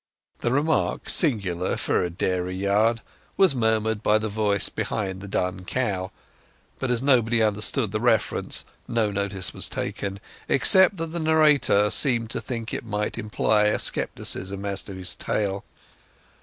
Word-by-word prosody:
The - - -1
remark, 145 +5 0
singular 100 - +1
for - - 0
a 90 - -1
dairy 90 +1 -2
yard, 105 +4 +1 0.4
was 190 -6 +5
murmured 110 -3 0
by 105 -1 +3
the 110 0 -3
voice 105 -2 0
behind 95 -3 -4
the 100 - -8
dun 90 -1 -2
cow; 95 -4 -2 0.7
but 130 - -2
as 125 0 0
nobody 120 -4 +3
understood 105 +2 +1
the 110 - -2
reference, 110 -2 0 0.2
no 115 -3 0
notice 100 -2 -2
was - - 0
taken, 100 0 -4 0.3
except 190 +6 +5
that 165 -1 -4
the 170 - -3
narrator 150 -10 +3
seemed 120 -5 +2
to - - -2
think 115 -3 -6
it - - -4
might 105 -2 -3
imply 105 0 +1
scepticism 95 +1 -1
as 100 -1 -1
to 100 - -8
his 95 -1 -2
tale. 100 -2 -2
105 Hz, 150 wpm, -24 LUFS, 100-120 Hz, 0.7 s, was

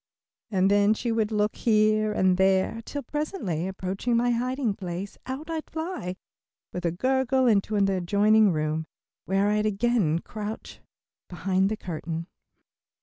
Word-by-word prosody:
and 195 -2 +2
then 205 +1 +4
she 235 +1 -2
would 225 -1 0
look 210 0 +1
here 215 -1 +3
and 185 -3 +2
there, 190 +4 +2
till 285 -1 -5
presently 245 - -3
approaching 190 +5 -1
my 245 +1 +2
hiding 250 -1 0
place, 190 0 -6
out 265 +4 -5
I'd 325 -2 -4
fly, 320 - -4 0.6
with 180 -1 -2
a - - 0
gurgle, 260 +6 +1
into 215 -2 +2
an 200 -1 +3
adjoining 200 +3 +3
room, 155 0 -1 0.4
where 195 +2 +2
I'd 210 0 +1
again 210 -6 +1
crouch 210 +4 -7 0.5
behind 190 +2 +1
the 215 - -2
curtain. 165 -2 -5
210 Hz, 145 wpm, -26 LUFS, 185-235 Hz, 0.6 s, then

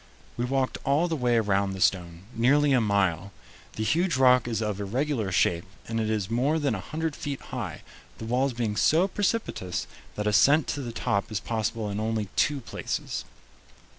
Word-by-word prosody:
We 120 - -1
walked 130 0 -1
all 145 +5 +2
the 165 - -1
way 125 -4 +1
around 100 -3 +1
the 95 - -6
stone, 85 -2 0
nearly 140 +5 +3
a 125 - +4
mile. 100 -3 +1 0.4
The 110 - -3
huge 170 +5 +1
rock 125 -2 +5
is 115 -3 -1
of 105 -2 -2
irregular 115 0 -1
shape, 85 -1 +2 0.2
and 115 0 -2
it 110 -1 -1
is 105 -3 -1
more 135 +7 +2
than 145 -5 0
a 100 - -3
hundred 155 - -3
feet 145 -5 -4
high, - - -6 0.3
the - - -7
walls 125 +3 +1
being 115 -3 -2
so 165 - +4
precipitous 200 - -2 0.3
that 105 - -3
ascent 140 +9 +5
to 145 - -2
the 120 -3 -5
top 110 -3 -1
is 105 - -1
possible 110 +1 -2
in 100 0 -3
only 110 -2 -1
two 145 -2 +1
places. - - -4
115 Hz, 185 wpm, -27 LUFS, 105-140 Hz, 0.4 s, rock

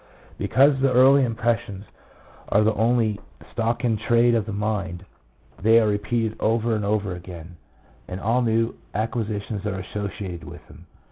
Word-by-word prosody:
Because 135 +1 +3
the 135 0 +2
early 135 +2 +6
impressions 115 -3 -2 0.6
are 105 - +3
the 110 +1 +2
only 110 -1 +1 0.3
stock 115 +2 -1
in 115 -2 +1
trade 120 +2 +3
of 110 -2 0
the - - -4
mind, 100 -3 -3 0.6
they 110 +3 +6
are 115 - +2
repeated 110 +2 -1
over 115 +1 +1
and 105 - -2
over 100 -2 -1
again, 90 -1 -10 0.5
and 90 - -6
all 115 +5 +1
new 115 -1 +1 0.2
acquisitions 110 -2 -3
are 105 -2 -3
associated 95 -2 -6
with 75 - -11
them. 85 +3 -16
110 Hz, 150 wpm, -23 LUFS, 100-115 Hz, 0.6 s, early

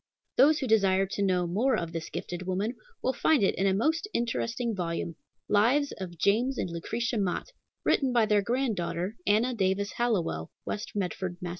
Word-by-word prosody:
Those 295 +4 +6
who 270 - -2
desire 195 -4 +3
to 195 +1 -4
know, 185 -2 +2
more 220 +10 +2
of 170 -1 -3
this 165 -1 -4
gifted 180 +1 -5
woman 200 +6 -1 0.3
will 260 - +1
find 285 -1 +3
it 195 - +3
in 195 +3 +1
a 190 - +3
most 320 - +1
interesting 235 0 -1
volume, 170 -2 -2 0.3
Lives 250 +8 +3
of 175 -3 -6
James 235 - +2
and 175 - -2
Lucretia 230 +7 -2
Mott, 195 - -2 0.3
written 270 -3 +2
by 235 -3 +4
their 210 -1 +3
grandaughter, 210 -5 -1
Anna 220 +5 +3
Davis 200 -1 0
Hallowell, 180 - 0 0.2
West 210 - -4
Medford, 185 -2 -2
Mass. 180 - -5
205 Hz, 175 wpm, -28 LUFS, 185-240 Hz, 0.3 s, Those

